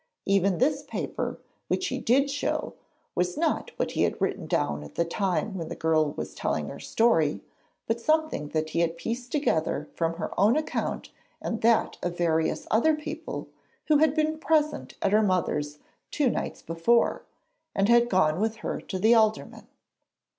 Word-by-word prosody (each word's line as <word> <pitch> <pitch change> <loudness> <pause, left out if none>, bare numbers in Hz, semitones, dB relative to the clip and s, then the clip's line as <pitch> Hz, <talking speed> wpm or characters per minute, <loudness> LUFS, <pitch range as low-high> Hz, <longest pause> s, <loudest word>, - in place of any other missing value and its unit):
Even 195 -2 +2
this 280 +3 +2
paper - - -4 0.3
which 370 - 0
he 260 - -3
did 275 +5 +2
show 290 - -2 0.4
was 180 0 -1
not - - 0
what - - -1
he - - -1
had - - +1
written - - -1
down 75 0 0
at 75 - -12
the 170 - +1
time 190 +3 -1
when 165 -4 -4
the - - -5
girl 155 -2 +1
was - - -6
telling - - -2
her - - -8
story, 165 -11 +2 0.4
but 230 +1 -1
something 310 - +1
that 155 0 -2
he 170 - 0
had 170 0 +1
pieced 240 +6 -4
together 160 - 0
from 165 0 -1
her 170 - -4
own 210 +8 +5
account 310 - -3 0.3
and 225 - -3
that 230 0 +2
of 175 0 -3
various 160 -2 +1
other 300 +9 +4
people 310 +1 -6 0.4
who 305 - +6
had 310 -1 +3
been 310 0 0
present 305 -2 0
at - - +2
her 215 - +5
mother's 150 -7 0 0.3
two 280 -5 +1
nights - - -4
before, 165 +9 +2 0.5
and 195 0 +2
had 240 +1 +5
gone 165 -4 +2
with 220 +1 0
her - - -2
to 190 - -5
the 220 +5 +5
Alderman. 220 -2 +1
215 Hz, 175 wpm, -27 LUFS, 165-270 Hz, 0.5 s, who